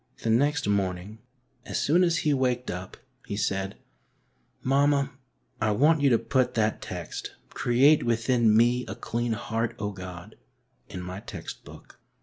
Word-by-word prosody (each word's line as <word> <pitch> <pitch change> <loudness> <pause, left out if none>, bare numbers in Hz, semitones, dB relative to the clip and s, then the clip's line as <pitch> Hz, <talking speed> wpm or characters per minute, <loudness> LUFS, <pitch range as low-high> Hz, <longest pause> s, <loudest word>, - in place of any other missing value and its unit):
The 115 - +1
next 145 +2 +2
morning, 100 +1 -1 0.4
as - - -4
soon 170 +6 +3
as 170 -2 +2
he 150 - +4
waked 125 -2 0
up, 90 +1 -7 0.3
he 100 - -3
said, 95 -2 -1 0.9
Mamma, 140 +1 +2 0.5
I 110 - +2
want 150 +7 +4
you 140 - +5
to 120 - +5
put 125 +2 0
that 110 -1 +1
text, - - -6 0.2
'Create 135 +5 +4
within 115 -1 +2
me 120 +2 +3
a - - -5
clean 120 0 -2
heart, 115 +1 -2
O 105 0 -3
God,' 90 -2 -9 0.5
in 90 - -6
my 90 +2 -6
text - - -8
book." - - -14
115 Hz, 150 wpm, -27 LUFS, 100-135 Hz, 0.9 s, you